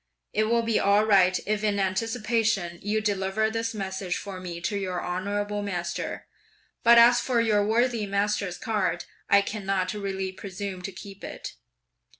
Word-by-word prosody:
It 215 +1 +2
will 235 +1 +2
be 225 -1 +1
all 200 +2 +4
right 185 -3 +4
if 215 +1 -1
in 205 -1 +1
anticipation 215 -2 0
you 215 +2 0
deliver 205 +1 0
this 225 0 -2
message 190 -2 -3
for 195 -2 -7
me 175 -2 -6
to 205 +4 -2
your 185 -3 -2
honourable 205 +3 -2
master; 180 -4 -4 0.6
but 235 0 +7
as 240 +1 +7
for 250 -3 +1
your 215 -3 +3
worthy 230 0 +1
master's 200 -2 0
card, 210 -5 -1 0.2
I 200 0 +6
cannot 195 -3 -2
really 195 -2 -3
presume 190 0 -6
to 195 - -5
keep 195 +1 -11
it.' - - -7
205 Hz, 155 wpm, -26 LUFS, 190-220 Hz, 0.6 s, but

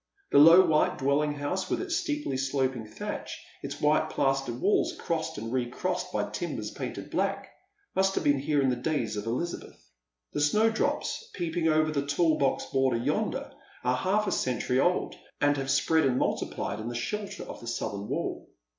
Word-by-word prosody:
The - - +7
low 165 +5 +9
white 155 -1 +2
dwelling 145 +2 +1
house, 145 +6 -2
with - - 0
its 370 -2 -2
steeply 295 - -2
eloping 130 -3 -1
thatch, 110 - -6 0.2
its - - -6
white 155 +1 +3
plastered 135 -4 0
walls 200 +7 +2
crossed 160 -2 -2
and 115 +3 -5
recrossed 130 +9 -2
by - - -1
timbers - - -4
painted - - -6
black, - - -1 0.5
must 195 0 +2
have - - 0
been 145 -1 +3
here 145 0 +1
in 130 - +3
the - - +1
days 125 -3 -1
of 105 +2 -4
Elizabeth. 150 +9 -4 0.5
The - - -1
snowdrops 220 - +1
peeping 170 -2 -1
over 155 0 +3
the 140 -2 0
tall 155 +2 +2
box 135 -1 +1
border 135 -3 +1
yonder 115 - -1 0.3
are 125 0 +2
half 195 +10 +1
a 195 - -1
century 125 -3 0
old, 175 +6 +1 0.3
and 145 0 +3
have 135 0 -3
spread 160 +4 +3
and 125 -1 +1
multiplied 105 - -2
in 110 - -5
the 120 - -4
shelter 205 - -4
of - - -8
the 120 - -10
southern 100 -3 -3
wall. - - -3
145 Hz, 180 wpm, -28 LUFS, 130-170 Hz, 0.5 s, low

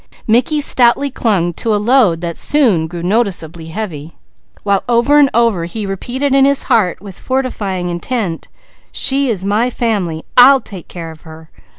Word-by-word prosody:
Mickey 250 +7 +1
stoutly 265 +1 +2
clung 190 -9 0
to 220 +5 -1
a - - +2
load 210 -6 +2
that 170 -1 -4
soon 225 - +2
grew 170 +1 -7
noticeably 175 -5 -2
heavy; 165 -4 -6 0.5
while 200 -1 +1
over 245 +5 +3
and 280 -2 +5
over 230 -7 +1
he 210 +5 -5
repeated 250 +8 -3
in 270 0 +4
his 280 0 +3
heart 185 -7 +1
with 195 -3 -11
fortifying 210 -9 -3
intent: 175 0 -3 0.4
"She 275 0 0
is 195 -5 -3
my 215 +5 +1
family, 200 -10 -2
I'll 265 +2 +7
take 190 -8 -11
care 165 -2 -8
of 160 - -15
her. 160 -1 -14
210 Hz, 165 wpm, -15 LUFS, 175-245 Hz, 0.5 s, I'll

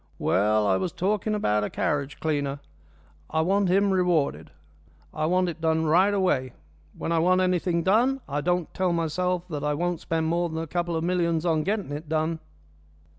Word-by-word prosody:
"Well, 105 +3 +2
I 95 -2 +3
was 175 - -2
talking 210 +3 -1
about 105 - +1
a - - -2
carriage 145 -1 -2
cleaner. 145 -3 -1 0.7
I 160 - +1
want 195 +3 +2
him 195 +2 +3
rewarded. 170 - +1 0.6
I 155 - -1
want 180 +1 +2
it 170 -1 -5
done 160 0 +1
right 180 +6 +4
away. 180 -11 0 0.4
When - - -3
I 165 - +2
want 185 +3 +3
anything 180 -2 +1
done 240 +9 +3
I 145 0 -2
don't 175 +1 -1
tell 185 -2 0
myself 180 +2 -1
that 150 -3 -4
I 150 0 0
won't 175 +1 -1
spend 160 -1 -1
more 170 +2 0
than 160 - -5
a 165 - -2
couple 175 +1 -2
of 160 - -1
millions 170 -2 0
on 160 -2 +2
getting 200 -2 -2
it 150 +2 -6
done." 160 +1 0
170 Hz, 185 wpm, -26 LUFS, 155-180 Hz, 0.7 s, right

